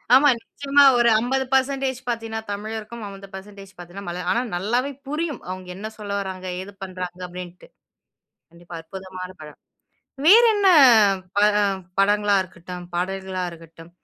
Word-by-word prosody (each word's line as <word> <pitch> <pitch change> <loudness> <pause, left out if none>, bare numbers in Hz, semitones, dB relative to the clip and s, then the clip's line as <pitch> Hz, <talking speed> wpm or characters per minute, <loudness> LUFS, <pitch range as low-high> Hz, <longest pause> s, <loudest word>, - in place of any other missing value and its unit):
ஆமா. 290 +2 +6
நிச்சயமா 280 +4 +2
ஒரு 240 -1 +4
50% 265 +1 0
பார்த்தீனா, 225 -1 -3
தமிழருக்கும். 220 +2 -6
50% 195 0 -11
பார்த்தீனா 175 +3 -9
மலயா 175 +1 -4
ஆனா 240 - +1
நல்லாவே 240 +9 -1 0.2
புரியும். 300 -1 -3
அவங்க 185 0 -6
என்ன 205 +3 -6
சொல்ல 210 -2 -7
வராங்க, 190 -1 -6 0.2
ஏது 195 +2 -9
பண்றாங்க 185 -1 -6
அப்டின்ட்டு. 180 0 -10 0.8
கண்டிப்பா, 170 0 -12
அற்புதமான 185 +1 -8
படம். 150 -1 -11 0.7
வேறென்ன 425 +1 +6 0.7
பட 205 - +5 0.5
படங்களா 205 +1 +3
இருக்கட்டும், 180 -1 -9
பாடல்களா 190 +1 -3
இருக்கட்டும், 165 0 -14
200 Hz, 120 wpm, -23 LUFS, 185-240 Hz, 0.8 s, ஆமா